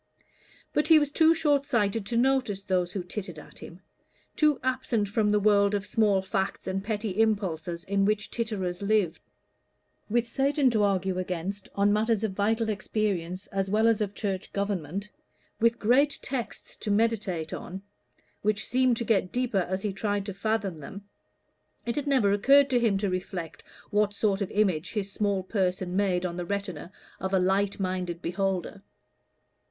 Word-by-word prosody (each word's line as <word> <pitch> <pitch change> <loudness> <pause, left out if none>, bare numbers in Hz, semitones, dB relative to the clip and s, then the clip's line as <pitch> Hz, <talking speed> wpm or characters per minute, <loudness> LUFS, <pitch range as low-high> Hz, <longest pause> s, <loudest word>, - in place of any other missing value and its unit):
But 300 - +2
he 320 -1 +8
was 295 -2 +1
too 320 +2 +5
short 290 -3 +1
sighted 215 -4 0
to 235 - -1
notice 250 -6 +1
those 180 -2 0
who 190 -1 -4
tittered 180 -2 -6
at 150 - -12
him 170 +2 -11 0.5
too 300 -3 +3
absent 255 -5 0
from 210 0 +1
the 210 0 +3
world 205 0 +3
of 200 0 -2
small 205 -4 +2
facts 190 0 -2
and 190 +1 -2
petty 215 -1 -1
impulses 175 -6 -1
in 200 0 0
which 210 +1 0
titterers 200 -6 -3
live. 200 -4 +1 0.9
With 235 +2 +1
Satan 275 +2 +2
to 220 -2 +1
argue 190 -2 +1
against 185 +2 -4
on 200 +1 +3
matters 220 0 +1
of 220 - 0
vital 220 +3 +1
experience 195 -3 -2
as 195 -1 -1
well 215 +3 +3
as 225 -2 +3
of 205 -1 -2
church 195 -2 -3
government, 200 -1 -3 0.5
with 230 +1 +3
great 275 +6 +3
texts 260 -4 -5
to - - -5
meditate 205 -7 0
on, 190 +2 -7 0.6
which 215 0 0
seemed 255 -1 +2
to 235 - -2
get 195 -5 +1
deeper 235 -7 0
as 190 +1 -2
he 205 -2 -1
tried 205 0 -2
to 200 - -5
fathom 200 -4 -2
them, 195 +8 -10 0.8
it 235 - -2
had 290 -1 -2
never 255 -8 +3
occurred 275 +7 +5
to 245 - +4
him 225 -4 +2
to 200 +1 -1
reflect 185 -2 -4 0.3
what 205 -1 +2
sort 200 -1 +1
of 195 - -1
image 185 -5 0
his 200 -2 -2
small 200 -2 0
person 185 -2 -1
made 185 -2 +1
on 175 -1 -3
the 175 - -3
retina 190 -3 -4 0.3
of 190 0 -1
a - - +4
light 195 +2 +1
minded 185 -2 -2
beholder. 190 +2 -2
200 Hz, 170 wpm, -27 LUFS, 190-225 Hz, 0.9 s, he